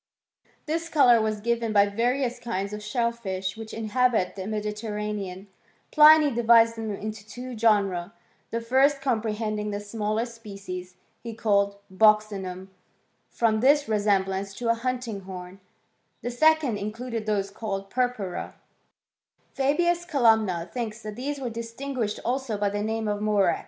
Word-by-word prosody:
This 330 +2 -2
colour 245 -8 +5
was 215 -1 -1
given 235 0 0
by 200 -1 +6
varioua 240 +4 -1
kinds 200 -4 -3
of 210 - -5
shellfish 210 -5 -2
which 225 -1 -8
inhabit 225 -2 +1
the 190 -1 -5
Mediterranean* 210 -2 -4 0.5
Pliny 305 -1 +7
divides 230 -1 +5
them 225 -1 -4
into 215 0 -6
two 245 +4 -8
genera; 200 -5 +1 0.4
the 230 - -2
first, 265 +4 +3
compre 230 -5 -1
hending 210 -1 -2
the 205 0 -3
smaller 215 +2 -2
species, 195 -6 -8 0.3
he 230 -2 -7
called 200 -3 +1 0.2
buccinunif 200 -3 +2 0.6
from 220 -2 +1
their 275 +5 +6
resemblance 195 -2 0
to 235 +1 -3
a - - +5
hunting 245 -2 -3
horn; 185 0 -9 0.6
the 245 - -2
second, 290 -3 +3
in 205 +1 -3
* - - -16
eluded 230 -3 -4
those 200 -2 0
called 195 -2 -5
purpura: 245 -8 -2 1.0
Fabius 345 +6 +1
Columna 220 - +2
thinktt 230 -2 -4
that 215 -1 -6
these 280 +4 -4
were 250 -3 -4
distinguished 230 0 -4
also 250 -3 -1
by 205 0 +1
the 205 0 -2
name 220 +1 -2
of 205 0 -2
murex. 205 -4 +2
220 Hz, 145 wpm, -26 LUFS, 205-240 Hz, 1.0 s, Pliny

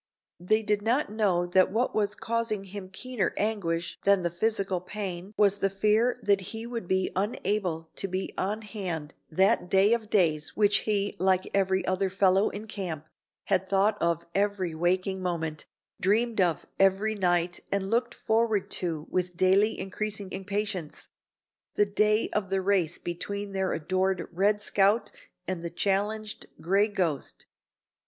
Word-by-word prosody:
They 215 +5 +1
did 210 -1 +1
not 235 +3 +1
know 195 -5 +1
that 185 +1 +3
what 235 +5 0
was 205 -1 0
causing 230 -3 -2
him 195 -1 -8
keener 240 +1 -2
anguish 170 -6 -1
than 200 -2 +4
the 170 - 0
physical 195 0 0
pain 185 -1 -5
was 205 -1 +4
the 195 - +2
fear 215 +5 +2
that 200 -1 +3
he 225 +4 -6
would 235 -5 -5
be 190 0 +1
unable 190 -4 -1
to - - -1
be 185 +1 -3
on 210 +4 -2
hand 180 -8 -5 0.2
on 155 - -17
that 190 -1 +3
day 195 +3 +5
of 225 -3 -2
days 160 -7 +2
which 205 -1 +4
he, 205 -1 +1
like 185 0 +2
every 190 -1 +1
other 185 +1 0
fellow 190 +1 +3
in 210 +2 -7
camp, 175 -8 -5 0.4
had 190 -1 0
thought 200 +2 +3
of 170 -1 0
every 200 -3 0
waking 185 +3 0
moment, 165 -4 -3 0.3
dreamed 220 +3 +2
of 170 -4 +1
every 195 +3 +3
night 175 -3 +1
and 200 0 -1
looked 240 +1 0
forward 220 -3 0
to 160 -4 -2
with 180 -1 -1
daily 195 +4 +3
increasing 200 0 -4
impatience 195 -4 -4 0.7
the 205 - +4
day 210 +2 +2
of 205 -3 -1
the 190 0 0
race 185 -4 +1
between 200 +4 -4
their 190 -1 -1
adored 185 +3 0
"Red 205 +4 +2
Scout" 205 +3 +2 0.4
and 185 -2 -2
the 170 - -3
challenged 205 +4 -1
"Gray 195 +6 +2
Ghost." 180 -9 -2
195 Hz, 155 wpm, -28 LUFS, 180-210 Hz, 0.7 s, day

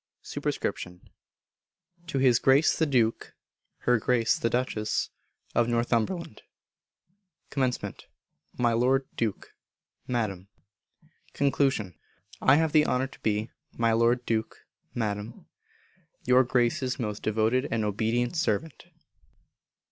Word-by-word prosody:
Sup._ 90 0 -4 1.1
To 170 - -3
His 130 -3 +4
Grace 135 +4 +4
the 160 - +1
Duke 120 -5 0 0.5
(Her 125 -1 +4
Grace 115 0 +2
the 115 - +1
Duchess) 115 -3 -1 0.4
of 120 0 +2
Northumberland. 120 - -1 1.1
Comm. 130 -3 -2 0.5
My 120 -2 +2
Lord 130 +3 +2
Duke 110 -4 -3 0.5
(Madam). 105 -7 -2 0.9
Con. 140 0 +2 0.9
I 135 - +6
have 160 0 +2
the 150 -1 +4
honour 125 +1 +1
to - - -16
be, 110 +2 -1 0.2
My 115 -1 +1
Lord 120 +2 +2
Duke 110 -1 -2 0.3
(Madam), 105 -3 -4 0.8
Your 125 +1 +5
Grace's 125 +2 +1
most 105 -3 -4
devoted 110 +5 +1
and 115 -1 0
obedient 115 - 0
servant. 160 0 -1
120 Hz, 105 wpm, -27 LUFS, 110-130 Hz, 1.1 s, I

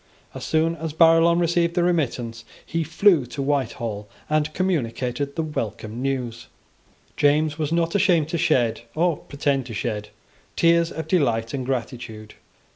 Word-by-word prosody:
As - - -7
soon 160 +1 +1
as 160 -1 -4
Barillon 165 +1 +5
received 170 0 +1
the 175 - +2
remittance, 125 -9 -1 0.2
he 165 0 -1
flew 165 -3 +3
to 140 - -5
Whitehall, 120 -7 -2 0.2
and 155 0 +1
communicated 140 -5 -2
the 165 - -1
welcome 115 -5 -4
news. 130 -4 -3 0.7
James 150 +1 +2
was 155 -1 -1
not 170 0 +1
ashamed 180 -6 +3
to 170 - -2
shed, 115 -6 +2
or 170 -1 +2
pretend 140 -3 -2
to 115 - -7
shed, 105 -2 -3 0.5
tears 170 0 +3
of 160 - -5
delight 115 -10 +1
and 130 -2 -3
gratitude. 115 -4 -5
145 Hz, 145 wpm, -23 LUFS, 120-165 Hz, 0.7 s, Barillon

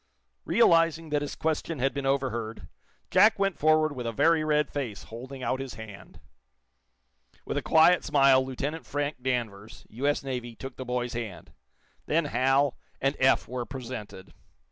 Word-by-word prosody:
Realizing 165 -6 +3
that 150 -1 0
his 145 - -4
question 160 0 -2
had 135 +1 0
been 140 -1 -3
overheard, 120 -5 -2 0.4
Jack 220 +1 +5
went 195 -2 0
forward 155 -1 +3
with 125 -2 -4
a - - -1
very 160 +7 +3
red 150 -1 +2
face, 125 -8 -4
holding 130 +3 -9
out 130 +2 -1
his 135 -1 -6
hand. 100 -4 -11 1.3
With - - -4
a - - 0
quiet 170 +3 +5
smile, 135 -3 +4
Lieutenant 140 +5 -5
Frank 145 -1 -3
Danvers, 115 -5 -4
U.S. 140 +6 -1
Navy, 125 -3 -5
took 135 +2 -8
the 130 - -7
boy's 125 -1 -2
hand. 115 -6 -7 0.5
Then 165 +1 +2
Hal 135 +1 +2 0.2
and 135 +2 0
Eph 130 0 +3
were 125 0 -4
presented. 120 -8 -8
135 Hz, 155 wpm, -27 LUFS, 120-150 Hz, 1.3 s, Jack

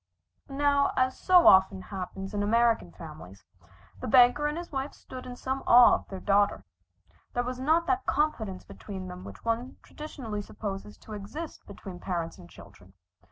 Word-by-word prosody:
Now, 280 0 +2
as 260 0 +2
so 360 -2 +5
often 190 0 +6
happens 195 0 -6
in 205 - -1
American 230 - +2
families, 90 +3 -12 0.5
the - - -5
banker 250 +5 +5
and 300 +2 -3
his 345 0 -7
wife 270 0 -4
stood 255 -1 -10
in 250 - -7
some 265 +2 -3
awe 245 0 +8
of - - -2
their 190 - -6
daughter. 200 - +2 0.7
There 245 - +1
was 250 +1 -5
not 320 +5 +2
that 380 +2 -1
confidence 225 -11 -1
between 190 -3 -8
them 180 +1 -9
which - - -11
one 230 +3 -2
traditionally 250 -9 -6
supposes 205 0 -7
to 215 - -11
exist 215 +11 -8
between 190 -2 -9
parents 170 -3 -4
and 85 - -13
children. 95 +1 -16
230 Hz, 165 wpm, -28 LUFS, 195-270 Hz, 0.7 s, awe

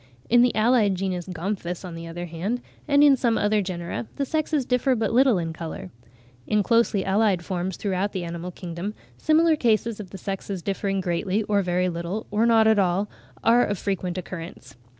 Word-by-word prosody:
In 240 0 +7
the 245 -3 +3
allied 215 -2 +3
genus 185 -1 -3
Gomphus, 180 0 -4
on 180 - -7
the 165 0 -7
other 175 +1 -5
hand, 175 +9 -3 0.3
and 285 0 +5
in 285 -2 +7
some 235 -3 +1
other 210 0 +2
genera, 170 - -4
the 280 - -1
sexes 305 -1 0
differ 250 +1 +2
but 220 -2 -1
little 255 -3 +5
in 165 -2 -3
colour. 160 - -7 0.6
In 210 -1 +2
closely 230 -3 +2
allied 195 -3 +2
forms 185 -1 -3
throughout 200 0 -1
the 185 - -3
animal 170 +1 -5
kingdom, 180 +3 -6 0.2
similar 320 +1 +4
cases 230 -4 +1
of 200 -3 -7
the 195 - -8
sexes 195 -1 -5
differing 195 -1 -1
greatly, 185 +4 -1
or 205 -1 +1
very 180 0 0
little, 175 +4 -4
or 215 +3 +2
not 225 -1 +5
at 220 -1 +4
all, 190 +2 +1 0.3
are 235 +2 +5
of 205 - -1
frequent 185 -2 -2
occurrence. 165 -7 -8
195 Hz, 190 wpm, -24 LUFS, 175-225 Hz, 0.6 s, In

